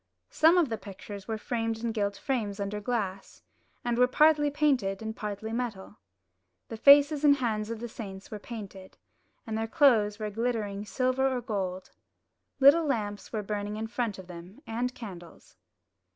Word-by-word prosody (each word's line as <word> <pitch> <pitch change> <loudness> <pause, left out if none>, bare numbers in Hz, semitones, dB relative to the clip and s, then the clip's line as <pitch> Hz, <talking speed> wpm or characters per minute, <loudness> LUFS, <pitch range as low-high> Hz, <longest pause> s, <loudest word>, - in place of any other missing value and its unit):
Some 325 +3 +5
of 335 -6 +3
the 225 -2 -3
pictures 200 0 -9
were 220 -1 -2
framed 225 0 -3
in 230 - 0
gilt 200 -2 -1
frames 215 -7 -2
under 200 +1 -3
glass, 200 -4 -4 0.4
and 240 0 0
were 250 - +6
partly 300 +2 +4
painted 270 -10 +1
and 220 0 -4
partly 210 +1 -5
metal. 230 -5 -4 0.7
The 225 - -6
faces 285 +4 +6
and 285 -1 +7
hands 220 -5 -2
of 230 -1 -4
the 240 - -5
saints 195 -4 -9
were 210 - -5
painted, 200 -4 -9 0.5
and 220 -2 -4
their 225 0 -1
clothes 225 -7 +4
were 215 -1 -4
glittering 215 -3 -2
silver 255 +2 +1
or 260 -1 -1
gold. 190 -6 -4 0.7
Little 295 +4 +6
lamps 210 -6 -3
were 215 -2 -3
burning 205 0 -3
in 220 - -3
front 230 -2 -3
of 190 - -10
them, 180 - -12
and 240 +2 -2
candles. 180 -7 -11
220 Hz, 165 wpm, -28 LUFS, 205-250 Hz, 0.7 s, and